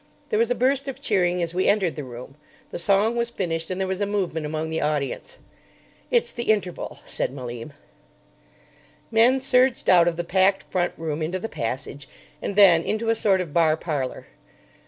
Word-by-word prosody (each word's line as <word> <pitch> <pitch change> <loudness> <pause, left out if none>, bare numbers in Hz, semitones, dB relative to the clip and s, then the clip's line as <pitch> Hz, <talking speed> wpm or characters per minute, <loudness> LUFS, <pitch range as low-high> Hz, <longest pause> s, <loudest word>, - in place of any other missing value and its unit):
There 435 - +1
was 465 - +2
a - - +1
burst 275 +2 +1
of 270 - -5
cheering 180 -3 +1
as 165 0 -3
we 185 +1 +1
entered 195 -7 +2
the 150 - -5
room. 125 +1 -10 0.4
The - - -5
song 200 +5 +2
was 235 0 0
finished, 165 -7 -3
and 185 0 -3
there 190 - 0
was 190 +1 -3
a 205 - +1
movement 180 -7 -2
among 155 +1 -3
the 160 - -1
audience. 150 - -2 0.7
"It's 480 -2 +2
the 235 - -5
interval," 205 -5 -1
said - - -2
Malim. 125 0 -7 1.4
Men 235 +4 +4
surged 260 -3 +3
out 175 -2 +6
of 170 - +1
the 175 - -3
packed 190 +2 +2
front 175 -1 0
room 160 -1 -3
into 165 +4 -2
the 185 - -4
passage, 135 - -5 0.3
and 200 - -4
then 185 -5 +7
into 220 +6 -2
a - - +5
sort 200 -4 +2
of 165 -5 -6
bar 160 -2 +3
parlour. 145 -6 -4
180 Hz, 190 wpm, -24 LUFS, 160-215 Hz, 1.4 s, then